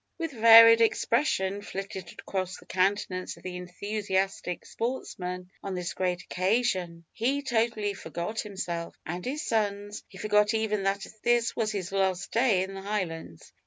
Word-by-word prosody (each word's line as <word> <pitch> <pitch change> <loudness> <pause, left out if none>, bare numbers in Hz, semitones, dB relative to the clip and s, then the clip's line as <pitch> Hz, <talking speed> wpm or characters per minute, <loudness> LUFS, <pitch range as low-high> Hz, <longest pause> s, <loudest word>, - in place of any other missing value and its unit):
What 330 -2 -3
varied 230 -1 +9
expression 220 -4 +1
flitted 195 -3 -6
across 185 -1 -3
the - - -16
countenance 185 -1 0
of - - -17
the 185 -1 -5
enthusiastic 190 0 -2
sportsman 180 -7 -4
on 195 -1 -4
this 180 -1 -3
great 180 -1 -1
occasion! 185 -4 0
He 275 +5 0
totally 225 -5 0
forgot 175 +4 -5
himself 175 -5 -4
and 175 +3 -4
his 285 +4 -3
sons; 205 -2 -1
he 190 - -14
forgot 210 +1 +3
even 215 -2 0
that 195 +1 0 0.2
this 240 -1 +2
was 220 -2 0
his 195 -3 -4
last 190 -1 0
day 225 -6 +3
in 190 +1 -6
the 195 - -7
Highlands. 170 - -4
195 Hz, 150 wpm, -28 LUFS, 185-225 Hz, 0.2 s, varied